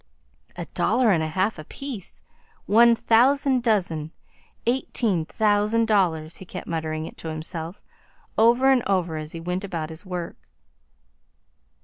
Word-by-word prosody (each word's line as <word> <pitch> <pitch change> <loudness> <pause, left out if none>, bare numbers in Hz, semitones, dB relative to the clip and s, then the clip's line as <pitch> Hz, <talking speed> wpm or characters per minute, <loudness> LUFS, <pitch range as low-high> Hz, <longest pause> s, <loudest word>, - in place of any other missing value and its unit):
A 175 - -5
dollar 230 +6 +2
'n 170 -4 +2
a 160 - -1
half 185 +4 -1
apiece 220 - -8 0.4
one 235 +2 +6
thousand 255 +3 +3
dozen 180 -9 0 0.5
eighteen 230 -7 0
thousand 215 +2 +2
dollars!" 170 -7 +1
he - - -10
kept - - -7
muttering 160 -1 -3
it - - -10
to - - -8
himself, 160 +2 -6 0.5
over 240 +4 +5
and 260 -2 +4
over, 180 -5 0
as 155 0 -6
he 165 - -6
went 180 +3 -3
about 165 -5 -4
his 160 +4 -9
work. 180 -3 -5
190 Hz, 135 wpm, -24 LUFS, 160-230 Hz, 0.5 s, one